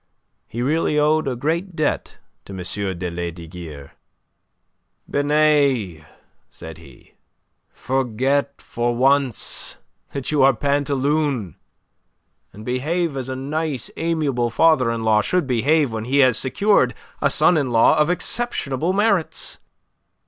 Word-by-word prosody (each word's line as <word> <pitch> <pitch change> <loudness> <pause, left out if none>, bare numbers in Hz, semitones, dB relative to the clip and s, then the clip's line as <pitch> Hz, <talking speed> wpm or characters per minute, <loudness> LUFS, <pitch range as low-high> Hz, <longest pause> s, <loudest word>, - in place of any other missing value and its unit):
He 120 +2 -4
really 150 +2 +1
owed 155 0 +2
a 130 - -1
great 165 +8 -2
debt 155 -2 -2 0.3
to 100 - -10
M. - - -7 0.4
de 90 0 -3
Lesdiguieres. 85 -4 -7 1.2
"Binet," 140 - +1 0.4
said - - -11
he, - - -18 0.6
"forget 135 +2 -1
for 120 0 -2
once 135 -1 +1 0.3
that 140 0 -4
you 150 -2 +2
are 135 -1 +5
Pantaloon, 140 - 0 1.0
and 105 +3 -12
behave 150 +6 -1
as 130 -1 -4
a 130 - -3
nice, 145 0 -3
amiable 150 -8 -1
father 130 0 +3
in 115 -1 -2
law 110 -1 +3
should 180 - 0
behave 135 +3 +2
when 110 0 -4
he 135 +3 0
has 125 -3 +2
secured 200 - +2 0.3
a - - +3
son 175 - +4
in 140 -5 0
law 115 -1 +4
of 150 +1 +2
exceptionable 180 - -1
merits. 200 -4 0
135 Hz, 125 wpm, -21 LUFS, 120-155 Hz, 1.2 s, are